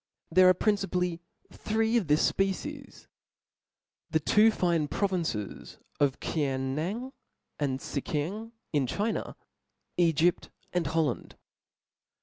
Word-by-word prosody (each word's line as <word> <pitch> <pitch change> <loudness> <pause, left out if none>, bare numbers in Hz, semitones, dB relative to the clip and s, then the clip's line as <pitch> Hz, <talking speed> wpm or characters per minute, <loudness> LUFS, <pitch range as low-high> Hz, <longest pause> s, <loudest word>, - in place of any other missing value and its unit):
There 185 +2 +7
are 185 - +5
principally 180 -4 0 0.3
three 220 +2 0
of 220 -8 +2
this 150 +1 +4
fpecies, 270 +9 -3 1.0
the 160 - +2
two 210 +8 +5
fine 170 -7 +1
provinces 170 - -2 0.2
of 140 -2 +2
Kiang 135 -4 -1
nan 205 - -3 0.5
andTcckiang 150 - -2 0.2
in 140 -4 +2
Chi 210 - 0
Aa^ - - -4 0.6
iEgypt, 170 +1 +3 0.2
and 175 -4 +1
Holland. 160 0 -1
175 Hz, 105 wpm, -29 LUFS, 150-205 Hz, 1.0 s, There